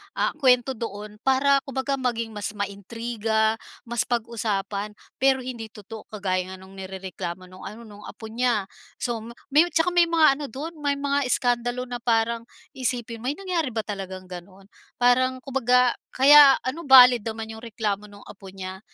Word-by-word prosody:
ah, - - +1
kwento 250 -1 +4
doon 210 -3 -7
para 275 +1 +4
kumbaga 270 +1 -2
maging 230 -3 -2
mas 210 0 -5
ma-intriga, 220 +2 -1 0.2
mas 235 -1 -1
pag-usapan 210 -3 -2 0.2
pero 265 -1 +3
hindi 235 -3 -6
totoo. 215 0 -11
Kagaya 185 -3 -3
nung 190 +1 -14
nirereklamo 190 -2 -7
nung 185 0 -11
ano, 215 +4 -10
nung 210 -2 -12
apo 220 -1 -10
niya 235 -3 +1 0.3
so 240 -2 -3
ma 230 +2 -10 0.2
may 305 +5 +5
tsaka 330 +1 +1
may 350 -1 +4
mga 315 -4 +4
ano 295 - -4
dun, 280 +8 -6
may 285 -1 0
mga 280 -1 0
iskandalo 245 0 0
na 245 -1 -6
parang 230 0 0 0.2
isipin 240 -3 -3
mo, 245 - -6
"May 285 - -1
nangyari 335 - -2
ba 220 - -1
talagang 190 -3 -6
ganun?" 185 +2 -12 0.2
Parang 255 +1 +2
kumbaga 250 -2 +2 0.2
kaya 280 +1 +8
ano, 285 +6 -4
valid 250 -4 +8
naman 220 0 -5
yung 220 - -9
reklamo 210 -3 -3
nung 205 0 -15
apo 195 -1 -13
niya 190 0 -8
230 Hz, 165 wpm, -24 LUFS, 205-260 Hz, 0.3 s, kaya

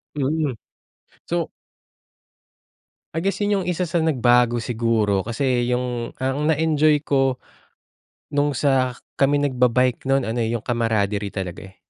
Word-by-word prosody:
Mm, 145 0 0 0.7
so 170 -1 -2 1.7
I 165 - -1
guess, 195 +1 -1
yung 205 -2 +1
isa 180 0 -1
sa 170 -1 0
nagbago 120 -5 +3
siguro, 110 -4 0
kasi 120 +1 0
yung 125 -1 -2
ang 135 +3 -1
na-enjoy 155 -1 +3
ko, 135 -2 +2 0.9
no'ng 145 0 +1
sa 130 -3 +2 0.2
kami 140 +1 +4
nagba-bike 125 -3 +2
no'n 135 -1 +3
ano, 115 +2 -2
eh, 110 - 0
yung 115 - -5
camaraderie 105 -4 0
talaga, 95 -1 -6
eh. 95 - -22
130 Hz, 125 wpm, -22 LUFS, 115-145 Hz, 1.7 s, kami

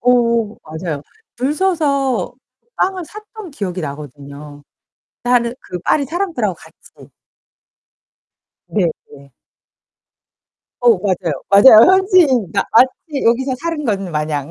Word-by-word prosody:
오오 235 -3 +1
맞아요. 160 -2 -6 0.3
줄 265 +5 -1
서서 295 -8 0 0.3
그 - - -48
빵을 370 -1 -1
샀던 425 +1 -11
기억이 190 -9 -5
나거든요, 145 0 -9 0.6
다른 245 -1 +1
그 180 - -7
파리 285 +9 +1
사람들하고 320 - -2
같이. - - -19 1.6
네 200 -5 0 0.2
네. 140 -2 -16 1.5
어우, 235 -5 +4
맞아요. 180 -7 -2
맞아요. 215 - +8
현지인 355 - +3
마치 265 +4 +1
여기서 255 +3 +1
사는 330 -2 -3
것 210 -5 0
마냥. 150 -5 -3
235 Hz, 230 characters per minute, -17 LUFS, -, 1.6 s, 맞아요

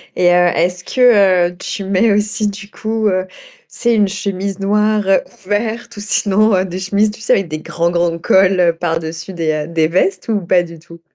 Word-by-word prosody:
Et 180 -1 +3
heu, 175 0 +4
est-ce 180 +2 -1
que, 200 -9 +3
heu, - - -16
tu 195 +1 -5
mets 195 +3 +2
aussi 210 +1 0
du 200 0 -7
coup, 220 0 -2
heu, 185 -2 0
tu - - -20 0.3
sais 235 -1 0
une 205 -2 +2
chemise 200 -1 -4
noire 210 +1 +1 0.4
ouverte 225 +4 -3
ou - - -6
sinon, 210 +1 +1
heu, 185 0 +1
des 185 0 -6
chemises, 200 +3 +1
tu 220 - -13
sais - - +2
avec 195 -2 0
des 155 -1 -5
grands 170 +2 -2
grands 170 -1 0
cols 180 -1 +3
par-dessus 165 +1 -4
des, 165 -3 -1
heu, 150 0 -3
des 165 -1 +1
vestes 185 +2 0
ou 215 -3 0
pas 175 0 +2
du 165 -1 -11
tout? 170 +1 -15
190 Hz, 205 wpm, -16 LUFS, 175-210 Hz, 0.4 s, heu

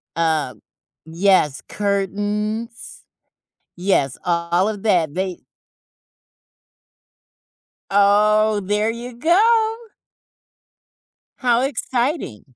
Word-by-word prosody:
Uh, 160 -5 0 0.5
yes, 165 -4 +2
curtains, 205 +3 -3 0.7
yes, 175 -8 0
all 170 +2 +1
of 210 -2 -5
that, 175 -9 +1
they 185 -1 -3 2.5
Oh, 210 +1 +3
there 210 +3 0
you 240 +1 -8
go! 440 - +3 1.6
How 245 -2 +2
exciting. 245 - -3
205 Hz, 65 wpm, -20 LUFS, 175-230 Hz, 2.5 s, Oh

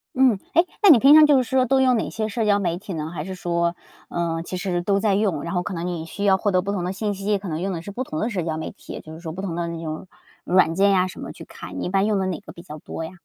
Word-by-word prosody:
嗯。 250 -6 +4
诶， 335 +2 +5 0.2
那 405 - +7
你 260 -8 +9
平 275 +4 +7
常 310 0 +9
就 290 -2 +5
是 255 - +3
说 260 -1 +3
都 265 +2 +3
用 255 -2 +4
哪 - - -2
些 215 -1 -3
社 220 +1 -2
交 205 -1 +3
媒 175 -3 -1
体 190 -1 -7
呢？ 155 0 -4
还 150 -2 -4
是 190 +1 -6
说， 170 -1 -1 0.3
呃， 165 -1 -2
其 185 - -5
实 180 -2 -1
都 200 +2 +1
在 200 -2 +2
用， 195 -8 0
然 170 - -4
后 180 - +1
可 190 - -5
能 170 0 -4
你 165 -2 -4
需 200 +5 -6
要 190 -1 +5
获 205 +1 0
得 185 - +3
不 200 +2 -3
同 190 -3 -2
的 180 - -2
信 205 0 -2
息， 200 +1 -1
可 195 - -8
能 155 +1 -3
用 195 +1 -1
的 165 - -4
是 200 - -8
不 250 +6 -3
同 155 -10 -5
的 225 - 0
社 190 -6 -2
交 160 -1 -2
媒 160 - -5
体。 - - -11
也 - - -7
就 155 - -11
是 160 - -9
说 165 -2 -6
不 185 +4 -6
同 175 -4 -4
的 170 -1 -2
那 165 0 -5
种 155 +3 -5 0.4
软 180 -2 +3
件 200 +2 +4
啊 185 0 +2
什 - - -10
么 - - -6
去 - - -11
看， 90 +1 -8
一 - - -2
般 195 +2 +2
用 215 -2 +1
的 190 - 0
哪 185 - -3
个 205 - -12
比 170 - -12
较 155 -2 -9
多 165 - -6
呀？ 160 - -6
190 Hz, 360 characters per minute, -23 LUFS, 170-210 Hz, 0.4 s, 你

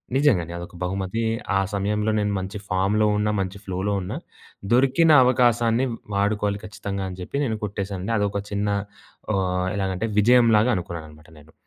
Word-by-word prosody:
నిజంగానే 105 - +2
అదొక 85 +1 -9
బహుమతి. 95 +4 -2 0.3
ఆ - - +3
సమయంలో 105 +2 0
నేను 105 -1 0
మంచి 95 +3 -5
ఫామ్‌లో 100 +3 +2
ఉన్న. 105 0 +1
మంచి 95 +1 -3
ఫ్లోలో 95 +2 -2
ఉన్నా. 90 - -5 0.6
దొరికిన 135 +6 +4
అవకాశాన్ని 120 -1 +3 0.3
వాడుకోవాలి 100 0 0
ఖచ్చితంగా! 100 -2 -5
అని 90 - -8
జెప్పేసి 140 +10 -2
నేను 110 -2 -3
కొట్టేసానండి. 100 0 -4
అదొక 100 0 -1
చిన్న 100 0 -1 0.7
ఆహ్! 90 -1 0
ఎలాగంటే? 95 +2 -1
విజయం 120 +3 +5
లాగా 110 +4 +3
అనుకున్నానన్నమాట 80 -4 -7
నేను. 75 +2 -19
100 Hz, 145 wpm, -24 LUFS, 95-110 Hz, 0.7 s, విజయం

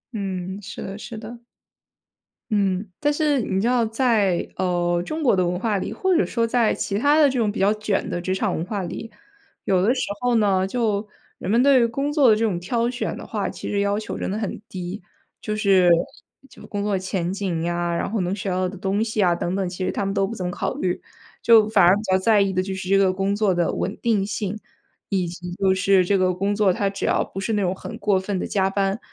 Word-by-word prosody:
嗯， 190 -1 -4
是 195 - -8
的， 195 +1 -6
是 225 +2 -8
的。 235 +2 -9 1.1
嗯， 200 -1 0
但 295 0 +2
是 295 -3 +1
你 190 -3 -1
知 215 - +1
道 245 -1 +2
在 220 -6 +1
呃， 175 -1 0
中 310 - -4
国 250 - +4
的 185 -1 +2
文 180 0 -2
化 215 -1 0
里， 195 - -4
或 370 - +1
者 340 - +3
说 230 -1 0
在 230 -1 +2
其 200 - -2
他 290 +5 +4
的 295 -2 +6
这 260 -1 -1
种 215 -3 +1
比 - - -6
较 200 +2 +4
卷 210 -2 -2
的 175 - -3
职 185 +1 -1
场 195 -1 -1
文 160 - -2
化 200 0 -3
里。 225 +5 -6 0.5
有 185 -2 +2
的 215 +6 +3
时 255 - -1 0.2
候 245 -1 +1
呢， 195 -4 +2
就 215 -2 -1 0.3
人 - - -5
们 235 +4 +4
对 275 -2 +6
于 - - +4
工 275 +5 -2
作 290 -4 +4
的 215 - +6
这 220 - -1
种 200 -6 0
挑 230 +6 -1
选 245 +1 -3
的 - - -8
话， - - -3
其 - - -7
实 205 - 0
要 200 0 +1
求 215 - -5
真 - - -3
的 200 - -2
很 215 -2 -4
低， 185 +2 -6 0.4
就 215 - -3
是 195 -4 +4 0.6
就 - - -14
工 205 -1 -3
作 205 -1 0
前 185 -2 -2
景 190 -5 -2
呀， 175 0 -1
然 170 - -2
后 225 - -1
能 180 +2 -1
学 200 -1 -4
到 185 0 0
的 195 +2 -7
东 195 +3 -1
西 220 -2 0
啊 175 -2 +4
等 175 +1 -2
等， 195 -1 -1
其 185 +1 -4
实 - - 0
他 205 - -2
们 195 - -1
都 195 -1 +1
不 230 - -6
怎 185 - -4
么 180 - -2
考 - - -3
虑。 180 -1 -2 0.4
就 225 -2 +6
反 215 - +4
而 180 +2 +6
比 205 - -3
较 185 - +5
在 205 +2 +3
意 195 -1 +1
的 185 -1 0
就 190 +1 -4
是 190 -1 -6
这 195 - +5
个 195 -1 +4
工 195 +1 0
作 205 -2 +2
的 175 -1 0
稳 195 - -3
定 215 -4 +1
性， 210 0 -3 0.5
以 190 -3 0
及 175 +1 -7
就 190 +1 +2
是 190 0 +3
这 195 +2 +2
个 185 -1 +2
工 195 +3 -1
作 205 -3 +3
它 200 +2 0
只 195 0 -4
要 - - +2
不 195 - -8
是 195 +3 -2
那 210 - +1
种 185 -1 0
很 190 - -8
过 200 -2 +2
分 190 +1 -3
地 - - -2
加 195 -1 +1
班， 195 +1 0
200 Hz, 270 characters per minute, -23 LUFS, 185-220 Hz, 1.1 s, 的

